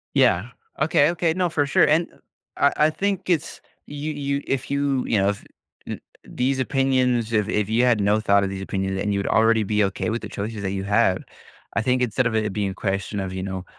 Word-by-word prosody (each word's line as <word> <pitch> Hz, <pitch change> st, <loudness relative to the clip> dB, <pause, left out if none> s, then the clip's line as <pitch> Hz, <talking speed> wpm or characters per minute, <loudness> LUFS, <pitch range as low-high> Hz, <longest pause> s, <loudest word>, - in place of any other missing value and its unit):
Yeah. 95 Hz, +8 st, +3 dB, 0.3 s
Okay, 155 Hz, -1 st, +4 dB
okay. 170 Hz, -1 st, 0 dB
No, 180 Hz, 0 st, 0 dB
for 145 Hz, -3 st, +1 dB
sure, 140 Hz, -, +4 dB
and, 160 Hz, +3 st, +3 dB
eh -, -, -22 dB, 0.4 s
I 140 Hz, -, +4 dB, 0.2 s
I -, -, +1 dB
think 195 Hz, 0 st, -2 dB
it's 160 Hz, -3 st, -1 dB, 0.3 s
you 145 Hz, +1 st, -4 dB
you 140 Hz, -1 st, -2 dB
if 135 Hz, -, -2 dB
you 140 Hz, -2 st, 0 dB
you 110 Hz, -, +2 dB
know, 100 Hz, +1 st, +3 dB
f 100 Hz, -, -4 dB, 0.4 s
n -, -, -5 dB, 0.2 s
these 130 Hz, +2 st, -1 dB
opinions, 130 Hz, -3 st, +1 dB
if 105 Hz, -1 st, +1 dB
if 105 Hz, -1 st, 0 dB
you 115 Hz, +3 st, +2 dB
had 120 Hz, -4 st, +3 dB
no 105 Hz, +2 st, +3 dB
thought 100 Hz, -2 st, +3 dB
of 95 Hz, -, -1 dB
these 95 Hz, 0 st, -5 dB
opinions 95 Hz, 0 st, -2 dB
and 105 Hz, -1 st, 0 dB
you'd 100 Hz, 0 st, -1 dB
already 110 Hz, 0 st, +3 dB
be 105 Hz, +1 st, +1 dB
okay 95 Hz, +3 st, -2 dB
with 115 Hz, -, -2 dB
the -, -, -7 dB
choices 105 Hz, +1 st, -5 dB
that 95 Hz, -1 st, -2 dB
you 95 Hz, -1 st, -3 dB
have, 100 Hz, -2 st, +2 dB, 0.5 s
I -, -, +2 dB
think 125 Hz, +2 st, +1 dB
instead 125 Hz, +1 st, +1 dB
of 110 Hz, -, -2 dB
it 105 Hz, -2 st, 0 dB
being 100 Hz, -1 st, -1 dB
a -, -, -7 dB
question 100 Hz, 0 st, -2 dB
of, 95 Hz, -1 st, -4 dB
you 95 Hz, 0 st, -4 dB
know 95 Hz, -1 st, -5 dB
115 Hz, 230 wpm, -23 LUFS, 100-140 Hz, 0.5 s, Okay